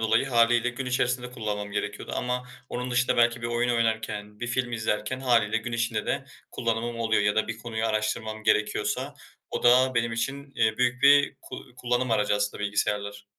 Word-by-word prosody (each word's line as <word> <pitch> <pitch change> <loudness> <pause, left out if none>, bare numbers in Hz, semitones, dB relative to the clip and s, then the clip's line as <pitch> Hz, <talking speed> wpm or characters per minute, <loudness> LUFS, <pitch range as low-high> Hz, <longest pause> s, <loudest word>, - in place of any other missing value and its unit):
dolayı 115 +4 +2
hâliyle 120 -1 +3
gün 130 +2 -5
içerisinde 125 0 0
kullanmam 105 -4 -4
gerekiyordu 105 0 -4
ama 125 0 -2 0.2
onun 125 +1 -4
dışında 125 0 +2
belki 120 0 +3
bir - - -1
oyun 120 +1 0
oynarken, 110 -2 -2
bir 120 - -2
film 120 0 -1
izlerken 110 +2 -2
hâliyle 115 -4 +2
gün 120 +2 -4
içinde 115 -2 -1
de - - -1 0.3
kullanımım 115 +1 -2
oluyor. 110 -2 +2
Ya 105 0 +2
da 110 - +1
bir 115 0 -4
konuyu 115 -1 -3
araştırmam 110 0 -2
gerekiyorsa 105 -1 0 0.4
o - - -3
da 130 +2 +5
benim 115 -1 +1
için, 135 +4 -4
eee, 110 -1 +1
büyük 125 +1 +1
bir 140 0 +6
ku - - -8 0.2
kullanım 125 0 0
aracı 105 -2 +2
aslında 105 0 -2
bilgisayarlar. 105 0 -2
115 Hz, 180 wpm, -26 LUFS, 110-125 Hz, 0.4 s, bir